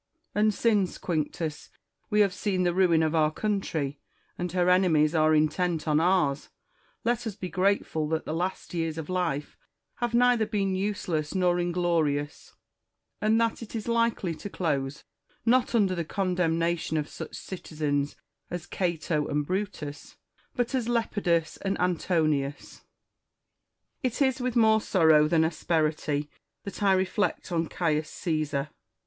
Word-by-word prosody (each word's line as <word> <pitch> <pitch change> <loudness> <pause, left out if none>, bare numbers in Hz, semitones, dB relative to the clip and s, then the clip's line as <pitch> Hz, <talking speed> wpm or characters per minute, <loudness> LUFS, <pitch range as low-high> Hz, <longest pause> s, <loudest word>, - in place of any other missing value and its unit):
And 215 +1 +3
since, 205 -3 +1
Quinctus, 155 -1 -3 0.4
we 210 -1 +4
have 200 -3 +3
seen 190 -2 -1
the 175 -1 +2
ruin 175 -3 +4
of 155 0 0
our 155 -2 +3
country, 155 -7 -2 0.4
and 180 -1 -3
her 180 0 +1
enemies 175 -4 +4
are 155 -1 +4
intent 160 +2 +1
on 150 0 +3
ours, 165 -5 +1 0.5
let 240 0 0
us 210 - -4
be 185 -2 -5
grateful 185 -5 0
that 160 0 -1
the - - -3
last 180 +3 -3
years 165 -2 -2
of 160 0 -6
life 165 -6 -1 0.4
have 240 -1 -1
neither 245 -2 +4
been 200 -3 0
useless 185 -5 -2
nor 180 -1 +2
inglorious, 170 -5 -1 0.7
and 220 +1 +3
that 230 0 0
it 230 0 -8
is 220 0 -4
likely 230 -6 +1
to 160 +6 -7
close, 145 -7 -2 0.4
not 245 0 +3
under 200 -5 +3
the 170 -2 -2
condemnation 170 -2 0
of 150 -1 -1
such - - -8
citizens 150 -5 -3 0.3
as 175 -1 -5
Cato 170 -4 -1
and 150 0 -1
Brutus, 185 -5 -4 0.4
but 245 0 -1
as 245 -3 0
Lepidus 200 -8 0
and 195 0 -2
Antonius. 155 -5 0 1.2
It 255 -5 -2
is 265 -2 +2
with 250 -1 -1
more 220 -2 +5
sorrow 160 -7 +4
than 160 0 +3
asperity 155 -2 0 0.4
that 200 - -7
I 195 -1 +4
reflect 190 +1 0
on 165 -1 0
Caius 155 -3 0
Caesar. 155 -4 -2
175 Hz, 145 wpm, -27 LUFS, 155-200 Hz, 1.2 s, more